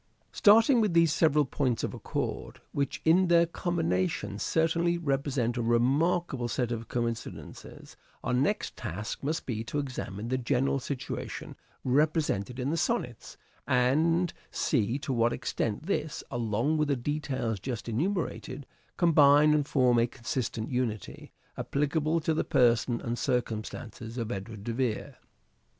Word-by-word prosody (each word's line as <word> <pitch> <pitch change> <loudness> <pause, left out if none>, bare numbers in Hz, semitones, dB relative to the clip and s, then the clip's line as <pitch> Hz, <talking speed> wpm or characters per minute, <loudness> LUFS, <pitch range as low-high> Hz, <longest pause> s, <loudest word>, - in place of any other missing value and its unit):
Starting 225 +3 +5
with 205 -6 +1
these 165 -2 +5
several 150 -3 +3
points 125 -2 -1
of - - -2
accord, - - -4
which 140 -2 -2
in 180 +3 +5
their 170 0 +5
combination 130 - -1
certainly 170 +4 +1
represent 135 -6 -1
a - - 0
remarkable 130 +4 +1
set 120 +1 -1
of 115 -1 -4
coincidences, 115 -1 -5 0.3
our 125 - -1
next 130 +4 0
task 105 +6 -5
must 155 +4 -2
be 115 -3 -3
to 145 - -4
examine 125 -7 -4
the 130 0 0
general 135 +2 +1
situation 130 0 -5 0.3
represented 135 -5 +1
in 130 +3 -1
the 165 - 0
Sonnets, 160 - -2 0.3
and 155 +7 +2 0.2
see 120 -2 0
to 140 -1 -3
what 120 0 +2
extent 110 +6 -2
this, 155 -5 -2
along 120 +5 0
with 150 - +2
the 140 - +2
details 130 -5 -2
just 120 +3 -5
enumerated, 155 - -2 0.3
combine 150 -3 +6
and 145 -2 +1
form 125 -4 +3
a 115 - +3
consistent 115 -2 -4
unity, 120 -5 -3 0.3
applicable 155 +3 0
to 160 0 0
the 155 - 0
person 120 -1 +2
and 120 0 -3
circumstances 115 -2 -3
of 115 -1 -3
Edward 100 0 -6
de 115 - -3
Vere. 120 -3 -2
130 Hz, 140 wpm, -29 LUFS, 120-155 Hz, 0.3 s, combine